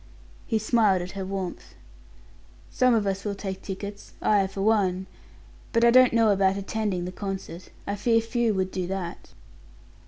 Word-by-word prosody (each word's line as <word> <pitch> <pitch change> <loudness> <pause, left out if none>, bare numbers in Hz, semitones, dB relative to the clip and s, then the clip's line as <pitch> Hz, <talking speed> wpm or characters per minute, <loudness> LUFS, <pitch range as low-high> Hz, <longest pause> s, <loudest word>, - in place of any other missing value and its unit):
He 225 - +1
smiled 215 -4 +2
at 180 - -7
her 195 -1 -5
warmth. 190 -2 -5 1.0
"Some 255 -2 +3
of 215 -2 +1
us 195 0 -2
will 205 -1 -2
take 195 -1 -5
tickets 200 +1 -7
I, 200 -2 +3
for 195 0 -4
one; 190 -4 +2 0.7
but 230 0 +4
I 235 - +6
don't 255 0 +7
know 230 -2 +4
about 195 -1 +2
attending 200 -3 -2
the 180 - -4
concert. 190 -2 -6 0.2
I 200 - -2
fear 225 +3 +2
few 225 -1 0
would 190 0 -1
do 185 -2 -3
that." 185 -2 -5
200 Hz, 165 wpm, -26 LUFS, 190-220 Hz, 1.0 s, don't